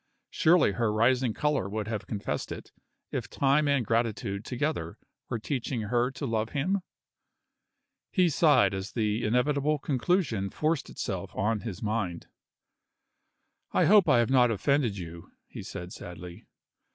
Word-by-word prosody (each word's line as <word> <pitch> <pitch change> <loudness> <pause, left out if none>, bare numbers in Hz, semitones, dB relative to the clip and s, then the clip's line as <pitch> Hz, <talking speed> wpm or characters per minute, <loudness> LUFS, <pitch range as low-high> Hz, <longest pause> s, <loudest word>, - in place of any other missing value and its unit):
Surely 170 - +4
her 110 +1 0
rising 120 +3 +2
color 150 -6 0
would 105 0 -3
have 105 -3 -4
confessed 100 +1 -3
it, - - -8 0.4
if - - -3
time 140 +2 +2
and 140 -4 +2
gratitude 110 -3 -1
together 125 - -3 0.3
were 120 - -1
teaching 125 +1 -3
her 120 +4 +1
to 135 +2 -6
love 110 -2 -1
him? 180 +8 +1 1.3
He 185 -3 +3
sighed 145 - +4
as 95 +1 -5
the 110 0 0
inevitable 140 +6 +1
conclusion 135 - 0
forced 155 - -1
itself - - -5
on 105 +2 0
his 110 -1 -6
mind. 105 -6 -2 1.5
"I - - +4
hope 205 -2 +6
I - - +6
have 120 +2 +2
not 125 -2 +5
offended 115 0 +1
you?" 85 -2 -9
he - - -9
said 90 +1 -7
sadly. 90 0 -10
120 Hz, 140 wpm, -28 LUFS, 105-140 Hz, 1.5 s, hope